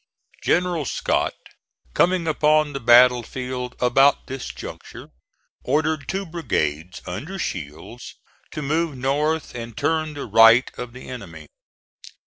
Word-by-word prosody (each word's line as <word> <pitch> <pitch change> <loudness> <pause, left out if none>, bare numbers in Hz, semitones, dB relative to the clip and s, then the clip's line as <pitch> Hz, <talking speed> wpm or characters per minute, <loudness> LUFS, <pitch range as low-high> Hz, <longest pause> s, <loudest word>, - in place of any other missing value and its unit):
General 175 -2 +1
Scott - - -1 0.6
coming 175 -1 +2
upon 155 -1 +2
the 135 - -4
battle 120 0 +6
field 125 0 -6
about 135 +3 +3
this 135 -1 -6
juncture, - - -10 0.5
ordered 150 +1 0
two 195 +1 -3
brigades, 90 - -3
under 140 - -6
Shields, 90 - -7 0.3
to 150 - -6
move 155 0 -1
north 145 +4 -1
and 115 -2 -8
turn 155 +1 -1
the 145 - -5
right 115 +3 +6
of 125 -1 -7
the 130 - -11
enemy. 90 -11 -9
135 Hz, 120 wpm, -22 LUFS, 120-155 Hz, 0.6 s, battle